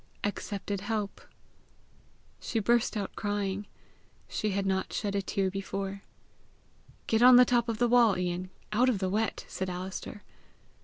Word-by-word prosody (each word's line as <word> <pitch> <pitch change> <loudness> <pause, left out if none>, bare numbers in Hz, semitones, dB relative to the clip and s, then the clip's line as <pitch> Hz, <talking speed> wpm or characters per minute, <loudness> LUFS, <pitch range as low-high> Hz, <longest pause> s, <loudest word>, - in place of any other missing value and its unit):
"Accepted 200 -1 -3
help." 210 -2 -3 1.2
She 230 - -3
burst 230 +1 +2
out 200 -2 -4
crying. 205 -1 -2 0.6
She 215 - -2
had 200 0 -1
not 190 0 0
shed 205 -2 -2
a 200 - +1
tear 195 -1 -1
before. 195 +1 -4 1.0
"Get 225 0 +1
on 250 +1 +9
the 250 0 +9
top 240 -1 +2
of 225 - -1
the 240 +1 +3
wall, 235 -5 +5
Ian, 180 0 -2 0.2
out 250 +4 +4
of 240 - +1
the 190 -1 -1
wet," 215 +3 -1
said 190 0 -4
Alister. 185 +3 -6
205 Hz, 150 wpm, -29 LUFS, 190-225 Hz, 1.2 s, on